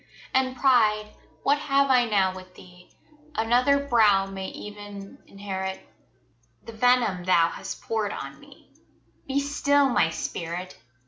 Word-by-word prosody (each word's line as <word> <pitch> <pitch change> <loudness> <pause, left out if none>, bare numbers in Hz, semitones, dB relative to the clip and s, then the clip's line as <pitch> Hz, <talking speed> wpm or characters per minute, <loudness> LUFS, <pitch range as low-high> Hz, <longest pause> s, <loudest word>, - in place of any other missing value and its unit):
And 260 0 +1
pride, 215 -5 +3 0.3
what 285 +1 +2
have 275 -1 +2
I 250 -2 +4
now 195 -4 +1
with 185 0 -12
thee? 180 0 -16 0.5
Another 250 +5 +2
brow 210 -6 +4
may 195 -1 -6
ev'n 205 -1 -10
inherit 190 -1 -5 0.8
The 230 - -10
venom 230 -5 +2
thou 170 -2 +3
hast - - -8
poured 220 -2 -2
on - - -7
me - - -19 0.5
Be 275 +1 0
still 285 0 +2
my 165 -9 +2
spirit! 170 +2 -5
210 Hz, 130 wpm, -25 LUFS, 190-255 Hz, 0.8 s, I